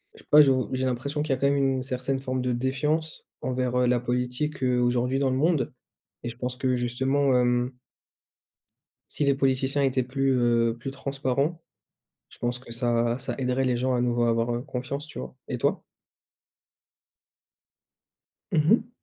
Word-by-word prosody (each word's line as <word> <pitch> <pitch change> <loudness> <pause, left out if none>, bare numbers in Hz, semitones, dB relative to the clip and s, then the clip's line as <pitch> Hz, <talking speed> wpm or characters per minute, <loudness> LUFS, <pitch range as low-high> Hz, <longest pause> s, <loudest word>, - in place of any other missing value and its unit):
je - - -15
sais - - -27
pas, 150 +1 +9
je 140 - +5
vou 130 -1 0
j'ai 130 0 0
l'impression 135 +4 -2
qu'il 150 -2 0
y - - 0
a - - -14
quand 140 - +3
même 140 0 +2
une 135 -1 +1
certaine 130 0 -2
forme 130 -1 -2
de 125 0 0
défiance 150 +6 -1
envers, 125 -1 -1
heu, 125 - +3
la 120 0 +3
politique, 125 +4 -2
heu, 125 -1 +2
aujourd'hui 125 +2 +1
dans 135 -1 +2
le 130 - 0
monde. 150 -4 +1 0.5
Et 120 - -3
je 120 - -9
pense 125 0 -3
que 130 0 0
justement, 130 +3 +1
hem 125 0 +1 1.4
si 145 - -1
les 140 - +3
politiciens 135 +1 +1
étaient 130 -1 +2
plus, 135 +1 0
heu, 120 -2 +2
plus 135 - -5
transparents, 140 +3 -2 0.7
je - - -16
pense 120 0 -1
que 125 -2 -13
ça 120 0 +1
ça 135 - -4
aiderait 130 0 0
les 125 -1 +1
gens 130 +1 0
à 120 - 0
nouveau 120 -1 +1
à 120 - +3
avoir, 115 +1 +1
heu, 120 - -3
confiance, 140 +2 -5
tu - - -8
vois? 65 0 -7
Et - - -2
toi? - - 0 2.7
Mmh 155 +4 +4
mh. 225 0 +2
130 Hz, 190 wpm, -26 LUFS, 125-135 Hz, 2.7 s, pas